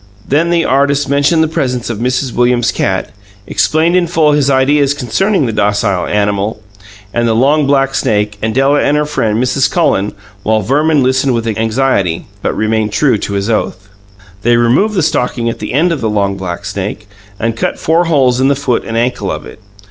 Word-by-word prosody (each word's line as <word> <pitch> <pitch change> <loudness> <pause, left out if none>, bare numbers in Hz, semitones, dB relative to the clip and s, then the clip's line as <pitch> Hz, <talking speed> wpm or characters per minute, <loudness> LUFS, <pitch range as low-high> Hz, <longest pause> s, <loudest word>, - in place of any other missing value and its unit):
Then 155 +5 +1
the 170 -1 +1
artist 140 +1 +1
mentioned 145 +4 +2
the - - +1
presence 125 -6 -2
of 110 - -5
Mrs. 125 +1 -1
Williams's 120 -1 +2
cat, 95 0 -2 0.3
explained 160 +3 +1
in 180 -1 +2
full 160 -3 +2
his 145 -2 +2
ideas 140 +1 +2
concerning 150 - 0
the 115 - -1
docile 100 -3 0
animal, 105 +1 -1 0.5
and 120 0 +1
the 110 - +1
long 140 +4 +2
black 135 -1 +2
snake, 105 -4 0
and 110 0 -2
Della 140 +2 +3
and 145 - +1
her 150 - +1
friend, 115 -8 -1
Mrs. 130 +2 +1
Cullen, 105 - 0 0.3
while 110 +1 +1
Verman 145 +5 +2
listened 130 0 +1
with 115 -1 -2
anxiety, 110 -5 0 0.2
but - - -2
remained 110 0 0
true 115 +1 +2
to 100 - -4
his 100 0 -1
oath. 105 -3 -2 0.5
They 120 +2 +3
removed 130 - +2
the 180 - +1
stocking 125 -5 -1
at - - -9
the - - -5
end 165 +7 +2
of 165 - -2
the 110 - 0
long 100 -2 0
black 90 -3 -6
snake, 100 +1 -5 0.3
and 115 0 -1
cut - - -2
four 165 +2 +1
holes 130 -6 +2
in 135 - +3
the 140 - +2
foot 135 -3 -1
and 115 - -4
ankle 120 +2 -1
of - - -5
it. - - -13
125 Hz, 195 wpm, -13 LUFS, 110-145 Hz, 0.5 s, Della